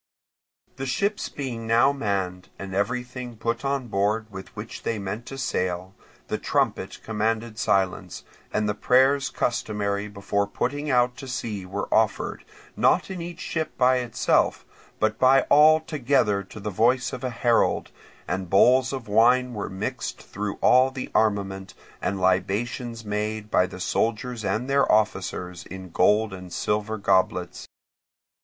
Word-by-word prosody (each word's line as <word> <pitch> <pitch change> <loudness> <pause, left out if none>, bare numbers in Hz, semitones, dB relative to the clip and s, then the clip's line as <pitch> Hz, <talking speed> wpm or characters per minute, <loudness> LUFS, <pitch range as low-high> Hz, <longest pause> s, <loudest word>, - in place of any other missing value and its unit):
The 135 - -4
ships 200 +11 -1
being 120 -5 -5
now 120 +5 +5
manned, 95 -8 -3
and 95 -1 -7
everything 125 +3 -3
put 115 +2 -2
on 135 -2 -1
board 105 +2 0
with 95 -1 -8
which 105 +2 -7
they 115 - -2
meant 105 +4 -5
to 135 - -7
sail, 90 -6 -2 0.3
the - - -2
trumpet - - -1
commanded 110 +1 -2
silence, 95 -2 0 0.3
and 105 - 0
the 105 - +1
prayers 130 +6 +3
customary 105 -3 -1
before 100 0 -1
putting 145 +8 -2
out 125 -1 +3
to 135 - -8
sea 110 -6 -4
were 95 - -3
offered, - - +1 0.3
not - - +2
in 185 -2 -5
each 170 0 -7
ship 160 -1 -3
by 130 0 +4
itself, 120 -2 +1 0.3
but 110 +1 +1
by 130 +1 +6
all 155 +2 +7
together 130 -9 +1
to 110 - -11
the 105 +1 -4
voice 120 +5 +2
of 130 0 -6
a 130 - -1
herald; 120 -1 +1 0.4
and 95 -1 -3
bowls 125 +7 +5
of 130 -5 -5
wine 125 +4 +4
were 105 -3 -4
mixed 95 0 -4
through 105 0 -4
all 130 +1 +5
the 130 -1 -6
armament, 95 -3 0 0.3
and 100 - -1
libations 110 +5 -1
made 105 +1 -3
by 90 - +3
the 90 0 -10
soldiers 115 +5 -1
and 110 +6 -1
their 140 0 +3
officers 90 -4 0
in 95 -1 -9
gold 105 +4 +3
and 90 -1 -9
silver 105 +3 -1
goblets. 95 -3 0
110 Hz, 150 wpm, -25 LUFS, 100-125 Hz, 0.4 s, all